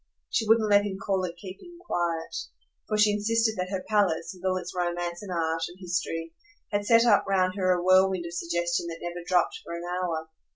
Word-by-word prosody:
She 225 - 0
wouldn't 220 0 +4
let 205 0 +6
him 200 -2 -3
call 195 -2 0
it 175 -1 -7
keeping 275 - -10
quiet, 170 - -2 0.5
for 215 - 0
she 210 0 +5
insisted 220 +2 +1
that 180 0 -2
her 190 -1 -4
palace 190 -6 +1
with 180 -1 -16
all 185 -1 +1
its 180 - -6
romance 175 -1 -2
and 200 -3 -7
art 165 -1 -1
and 175 - -13
history 165 -2 -3 0.4
had 205 0 -1
set 230 0 +6
up 210 -4 +5
round 185 -2 +2
her 185 -2 +2
a 175 -1 +1
whirlwind 185 -1 +4
of 170 - -7
suggestion 170 0 -1
that 165 -1 -5
never 175 0 -5
dropped 180 0 +1
for 170 - -6
an 170 - -6
hour. 175 -3 -2
185 Hz, 210 wpm, -27 LUFS, 175-205 Hz, 0.5 s, let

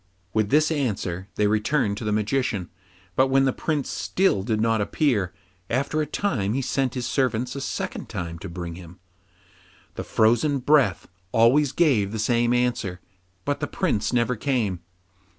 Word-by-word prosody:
With 110 -2 +1
this 155 +4 +3
answer 100 - -2
they 105 - +2
returned 105 +1 +1
to 115 - -6
the 105 - -1
Magician. 105 -3 -1 0.4
But 130 - +4
when 135 0 +3
the 130 - +2
Prince 150 -4 -2
still 190 - +1
did 110 +1 -1
not 115 -1 +2
appear, 105 - +1 0.4
after 140 +5 0
a 150 - -2
time 110 - -1
he 135 - 0
sent 130 -1 -1
his 125 -1 -2
servants 125 -1 0
a 140 - -4
second - - -4
time 85 -1 -5
to 100 - -7
bring 85 0 -6
him. 90 +1 -12 0.9
The - - -5
frozen 120 +6 +2
breath 140 +1 +2 0.2
always 130 +5 +4
gave 130 - +2
the - - -2
same 120 +2 +2
answer, 120 -7 0 0.5
but 145 0 -1
the 145 - -2
Prince 110 - 0
never 125 0 +1
came. 110 -7 -1
120 Hz, 165 wpm, -24 LUFS, 105-135 Hz, 0.9 s, But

